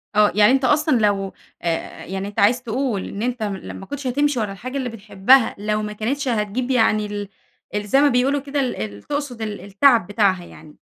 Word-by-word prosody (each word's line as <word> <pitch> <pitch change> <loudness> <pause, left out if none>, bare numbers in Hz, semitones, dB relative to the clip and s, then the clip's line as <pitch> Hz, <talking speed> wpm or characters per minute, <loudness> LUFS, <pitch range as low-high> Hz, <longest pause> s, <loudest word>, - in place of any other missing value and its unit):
آه، 210 0 +5
يعني 210 +2 +6
أنت 265 0 +2
أصلًا 295 0 +3
لو 200 -2 +1 0.3
أ - - -4 0.4
يعني 195 +1 -4
أنت 205 - -5
عايز 245 +5 +3
تقول 240 -3 -2
إن 200 - -6
أنت 245 -1 -2
م 200 -2 -2
لو - - -8
ما 195 - -9
كنتش 280 +5 -5
هتمشي 285 +1 +1
ورا 210 -3 -2
الحاجة 255 +7 -6
اللي 260 -2 -2
بتحبها، 225 +3 +3
لو 210 +1 -1
ما 210 0 -4
كانتش 265 +7 -2
هتجيب 235 +2 -1
يعني 220 -4 +3
ال 205 -1 -5 0.5
ال 210 0 -2
زي 270 +7 +4
ما 290 - +5
بيقولوا 265 +3 +2
كده 285 +1 -3
ال 260 -2 -1
ال 100 -1 -6
تقصد 285 -5 -4
ال 215 -2 -4
التعب 205 +1 +3
بتاعها 200 -4 +1
يعني. 155 -2 -15
220 Hz, 215 wpm, -21 LUFS, 205-260 Hz, 0.5 s, يعني